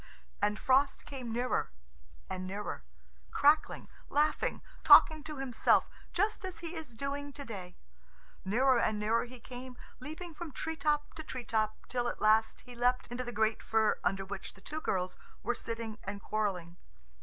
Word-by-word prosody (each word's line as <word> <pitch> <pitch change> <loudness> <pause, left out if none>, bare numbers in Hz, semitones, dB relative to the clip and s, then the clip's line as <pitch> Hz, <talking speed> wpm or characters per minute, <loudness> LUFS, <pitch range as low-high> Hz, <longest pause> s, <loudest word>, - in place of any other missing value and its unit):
And 210 0 +2
Frost 270 +4 +3
came 255 -5 -6
nearer 245 +2 0 0.6
and 185 0 -4
nearer, 200 - -4 0.5
crackling, 295 +2 +3 0.2
laughing, 300 +1 +1 0.2
talking 310 -1 +8
to 305 -2 -6
himself, 265 -4 +3 0.2
just 415 +3 0
as 370 -2 -5
he 335 0 -6
is 315 -8 -7
doing 285 +3 -3
to 280 - -7
day. 185 -6 -7 0.7
Nearer 245 +6 +4
and 220 -2 +1
nearer 220 +3 +1
he 250 0 -11
came, 250 +1 -9 0.2
leaping 315 +5 -7
from 315 -2 -7
tree 320 +4 -3
top 295 -1 0
to 315 - -7
tree 255 -5 -6
top, 215 -1 -1
till 245 -1 -1
at - - -3
last 220 +1 +3
he 250 - -12
leapt 245 +1 +1
into 245 +1 -3
the 240 - -5
great 220 -1 +1
fir 220 -1 +2
under 195 +1 0
which 195 0 -6
the - - -16
two 310 +1 -5
girls 185 -6 -1 0.2
were 240 - +1
sitting 230 -2 -5
and 200 +1 -5
quarrelling. 185 -5 -2
245 Hz, 165 wpm, -32 LUFS, 215-285 Hz, 0.7 s, talking